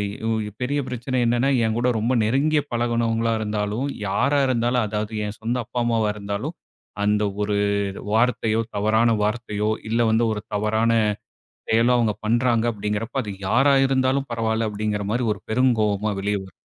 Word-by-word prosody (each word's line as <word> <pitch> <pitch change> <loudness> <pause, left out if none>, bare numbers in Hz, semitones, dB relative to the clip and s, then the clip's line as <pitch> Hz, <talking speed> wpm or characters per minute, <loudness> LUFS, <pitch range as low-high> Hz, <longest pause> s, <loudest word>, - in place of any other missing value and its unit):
இ - - -9
உ - - +1 0.3
பெரிய 140 +3 0
பிரச்சனை 125 +1 -3
என்னன்னா 120 +3 +2 0.2
என்கூட 120 +3 0
ரொம்ப 120 +4 0
நெருங்கிய 145 +7 +2
பழகுனவங்களா 115 -1 0
இருந்தாலும், 105 +4 -2 0.2
யாரா 140 +9 +2
இருந்தாலும், 120 -1 +1
அதாவது 105 +1 -3
என் 105 +1 -6
சொந்த 120 +3 -1
அப்பா, 125 - -4
அம்மாவா 115 -2 +1
இருந்தாலும் 105 +11 -4 0.5
அந்த 105 0 +2 0.2
ஒரு 105 0 0 0.6
வார்த்தையோ 115 -1 +2
தவறான 110 +3 +3
வார்த்தையோ, 105 -1 -1 0.2
இல்ல 115 +1 +1
வந்து 115 +1 +3
ஒரு 105 - -4
தவறான 110 +2 +1 0.8
செயலோ 115 +2 +4
அவங்க 115 -3 +2
பண்ணுறாங்க 115 +1 +2
அப்படிங்கிறப்ப 105 +5 -3
அது 105 - -5 0.2
யாரா 135 +7 +4
இருந்தாலும் 135 +1 +1
பரவாயில்ல 115 -1 0
அப்படிங்கிற 105 0 -2
மாரி 120 +2 0
ஒரு 100 - -13
பெருங்கோவமா 110 -4 +1
வெளிய 100 +1 -1
வரும். 95 - -13
115 Hz, 150 wpm, -23 LUFS, 105-125 Hz, 0.8 s, செயலோ